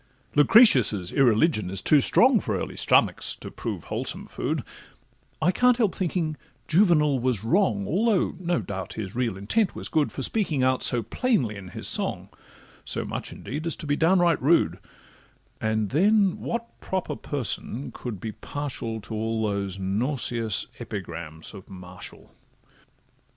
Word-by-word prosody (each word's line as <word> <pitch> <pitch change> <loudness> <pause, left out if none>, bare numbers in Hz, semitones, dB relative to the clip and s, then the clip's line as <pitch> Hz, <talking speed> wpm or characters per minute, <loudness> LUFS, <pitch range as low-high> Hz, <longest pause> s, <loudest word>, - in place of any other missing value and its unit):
Lucretius' 140 - +5
irreligion 120 - +3
is 95 0 -1
too 150 +6 +4
strong, 250 - +5
For - - -2
early - - -5
stomachs, - - +2
to - - -9
prove - - -5
wholesome - - -4
food; - - -3 0.8
I 180 - +3
can't 250 +4 +3
help 220 -6 +2
thinking 165 -4 -2 0.3
Juvenal 155 -6 +4
was 120 -5 0
wrong, 115 - +1
Although 210 +2 +1
no 175 -1 0
doubt 95 -3 -6
his 100 -3 -6
real 120 -5 -1
intent 185 - 0
was - - -5
good, 155 -2 +1
For 135 - -4
speaking 160 - 0
out 130 0 +2
so 120 -2 +3
plainly 180 - 0
in 100 -2 -9
his 90 - -4
song, - - -2 0.5
So - - -3
much - - -4
indeed 150 +5 -6
as 165 - 0
to 165 - -8
be 145 -1 +1
downright 170 0 +3
rude; 155 +6 +3 0.8
And 110 -1 0
then 195 +5 +3
what 235 0 -5
proper 190 -1 -3
person 135 -1 -4
can 120 -4 -6
be 110 +4 -6
partial 120 -5 -5
To 110 - -8
all 110 +1 -1
those 100 -2 -2
nauseous 115 +2 -1
epigrams 85 -5 -7
of 95 -3 -12
Martial? 90 -1 -11
130 Hz, 150 wpm, -25 LUFS, 105-175 Hz, 0.8 s, Lucretius